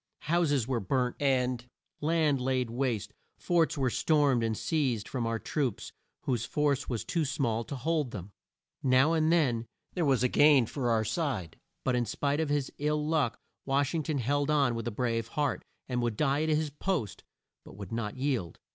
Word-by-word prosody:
Houses 150 -7 +1
were 130 -3 0
burnt 125 +5 0
and 125 -3 +1 0.4
land 155 -3 +2
laid 130 -2 0
waste, 120 -5 -1 0.2
forts 170 -3 +1
were 130 -3 +1
stormed 145 -6 +3
and 110 -2 0
seized 130 -10 0
from 120 -3 -2
our 115 0 0
troops 130 -2 -2 0.3
whose 120 -4 0
force 145 +2 0
was 120 -4 -2
too 165 - 0
small 125 -5 0
to 140 - -5
hold 150 +1 0
them. 100 -4 -8 0.5
Now 130 +4 +4
and 160 0 +2
then 125 -9 +2 0.3
there 175 - 0
was 135 -4 +3
a - - +5
gain 145 -1 +5
for 125 +1 -2
our 110 -1 +2
side, 115 - -2 0.3
but 125 - +1
in 120 -1 0
spite 140 +7 -1
of 160 -2 0
his 145 -2 0
ill 150 +1 0
luck 155 -7 +1 0.3
Wash 140 +2 +1
ing 165 - 0
ton 155 -1 -2
held 140 +3 0
on 140 -5 +3
with 115 0 -4
a - - -1
brave 115 0 -1
heart, 145 +3 -1 0.2
and 125 -1 -1
would 120 -3 -1
die 145 0 +2
at 160 - 0
his 155 -1 +1
post 150 - -2 0.4
but - - -13
would 100 -3 -8
not 115 0 -3
yield. 130 - -1
135 Hz, 190 wpm, -30 LUFS, 120-150 Hz, 0.5 s, a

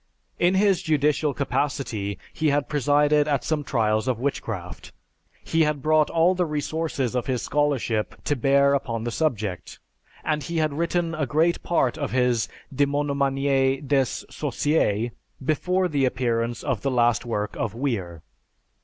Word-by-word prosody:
In 180 +2 +3
his 195 -1 +3
judicial 150 -1 +1
capacity 125 -8 -2 0.2
he 160 - 0
had 145 0 +1
presided 145 +1 +3
at 140 -3 0
some 155 -2 -1
trials 110 -3 0
of 125 -3 +1
witchcraft. 110 -9 -4 0.5
He 165 - +1
had 150 -3 +1
brought 155 -1 +3
all 170 +2 +3
the 180 -2 0
resources 150 -4 -2
of 125 -1 -2
his 125 -3 -1
scholarship 135 -7 0
to 145 - 0
bear 140 +2 +3
upon 115 -5 -1
the 120 - -2
subject, 110 - -2 0.5
and 150 -1 0
he 165 +5 -4
had 155 -2 +1
written 170 +2 -1
a 155 -4 -1
great 160 +6 +2
part 155 -4 0
of 145 -4 -3
his 125 -3 +1 0.2
"Demonomanie 140 -1 +1
des 135 -2 +3 0.3
Sorciers" 120 -7 0 0.3
before 180 +5 +1
the 145 -5 +1
appearance 120 -2 -1
of 130 -6 -1
the 140 - 0
last 120 -2 +2
work 105 -3 -3
of 115 -2 -3
Wier. 95 - -3
140 Hz, 150 wpm, -24 LUFS, 120-150 Hz, 0.5 s, In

